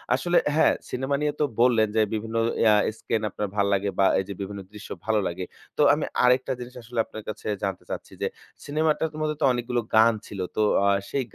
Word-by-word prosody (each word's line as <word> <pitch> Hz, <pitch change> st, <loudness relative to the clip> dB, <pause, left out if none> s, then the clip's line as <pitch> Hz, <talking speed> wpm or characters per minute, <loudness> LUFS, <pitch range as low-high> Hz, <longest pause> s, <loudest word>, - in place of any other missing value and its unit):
আসলে 175 Hz, +6 st, +1 dB, 0.2 s
হ্যাঁ, 160 Hz, -, +5 dB, 0.2 s
সিনেমা 135 Hz, +2 st, -1 dB
নিয়ে 150 Hz, 0 st, +1 dB
তো 150 Hz, -, +3 dB, 0.2 s
বললেন 115 Hz, -3 st, +4 dB
যে 110 Hz, -, +4 dB
বিভিন্ন 110 Hz, +1 st, -4 dB, 0.3 s
ইয়া 110 Hz, -2 st, +6 dB, 0.3 s
স্কেন 110 Hz, -, -1 dB
আপনার 105 Hz, +2 st, -3 dB
ভাল্লাগে 100 Hz, -1 st, +1 dB
বা 95 Hz, -, +5 dB
এইযে 95 Hz, +1 st, -4 dB
বিভিন্ন 100 Hz, +1 st, -5 dB
দৃশ্য 105 Hz, 0 st, -10 dB, 0.2 s
ভালো 110 Hz, -1 st, +2 dB
লাগে। 90 Hz, +2 st, -4 dB, 0.3 s
তো -, -, +2 dB
আমি -, -, -1 dB, 0.2 s
আরেকটা 125 Hz, +1 st, +3 dB
জিনিস 125 Hz, +1 st, -8 dB
আসলে 115 Hz, 0 st, -5 dB
আপনার 110 Hz, -, -9 dB
কাছে 110 Hz, -, -6 dB, 0.2 s
জানতে 95 Hz, -2 st, -2 dB
চাচ্ছি, -, -, -6 dB
যে -, -, +1 dB, 0.4 s
সিনেমাটা 155 Hz, +2 st, +1 dB, 0.2 s
মধ্যে 155 Hz, 0 st, 0 dB
তো -, -, +6 dB
অনেকগুলো 120 Hz, 0 st, -1 dB
গান 115 Hz, +1 st, +6 dB
ছিল। 100 Hz, -, -8 dB, 0.2 s
তো 110 Hz, -, +3 dB, 0.2 s
আ -, -, +4 dB, 0.2 s
সেই 135 Hz, -2 st, -1 dB
115 Hz, 195 wpm, -25 LUFS, 105-130 Hz, 0.4 s, ইয়া